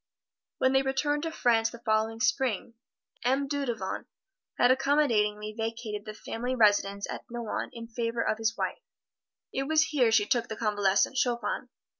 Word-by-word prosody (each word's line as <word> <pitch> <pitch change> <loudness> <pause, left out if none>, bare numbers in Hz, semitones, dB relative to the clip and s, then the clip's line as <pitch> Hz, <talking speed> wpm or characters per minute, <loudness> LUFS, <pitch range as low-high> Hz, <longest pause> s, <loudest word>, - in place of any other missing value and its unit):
When 260 0 +2
they 265 - +5
returned 280 +2 0
to 325 +1 -3
France 230 -6 +2
the 235 - -10
following 225 0 0
Spring, 245 -2 0 0.5
M. 270 +3 +1
Dudevant 260 -9 -3 0.5
had 245 - +5
accommodatingly 220 -7 +2
vacated 225 -2 -4
the 215 - -7
family 245 +4 -3
residence 205 -3 +3
at - - -6
Nohant 235 -2 -3
in 230 0 -7
favor 230 0 -2
of 215 - 0
his 225 0 0
wife. - - -2 0.7
It 270 +1 -1
was 315 +1 +3
here 255 -7 +3
she 220 -2 +4
took 240 0 +1
the 220 - -5
convalescent 205 +2 +2
Chopin. 240 -1 -1
235 Hz, 155 wpm, -29 LUFS, 215-265 Hz, 0.7 s, they